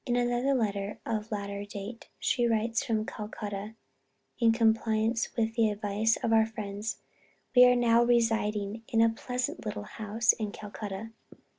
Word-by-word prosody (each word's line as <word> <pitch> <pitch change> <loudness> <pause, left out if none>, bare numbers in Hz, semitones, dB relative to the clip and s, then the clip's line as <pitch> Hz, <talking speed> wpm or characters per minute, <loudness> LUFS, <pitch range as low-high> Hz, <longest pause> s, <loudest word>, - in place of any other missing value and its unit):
In 240 - +1
another 245 +3 +1
letter 205 -3 -1
of 220 0 -3
a - - 0
later 200 0 -4
date 205 +3 -8
she 240 -2 +1
writes 225 0 +1
from 220 -2 -1
Calcutta: 210 -1 -6 0.6
"In 230 -2 +5
compliance 225 0 +2
with 225 -1 +1
the 225 -2 +3
advice 210 +1 0
of 225 - +2
our 220 0 +5
friends, 210 0 -5 0.6
we 250 0 +9
are 250 0 +6
now 235 -1 +4
residing 225 -3 +1
in 225 - 0
a 230 0 +6
pleasant 250 +2 -3
little 210 -1 -4
house 220 +1 +1
in 215 -2 -4
Calcutta. 210 +1 -7
225 Hz, 155 wpm, -29 LUFS, 210-230 Hz, 0.6 s, we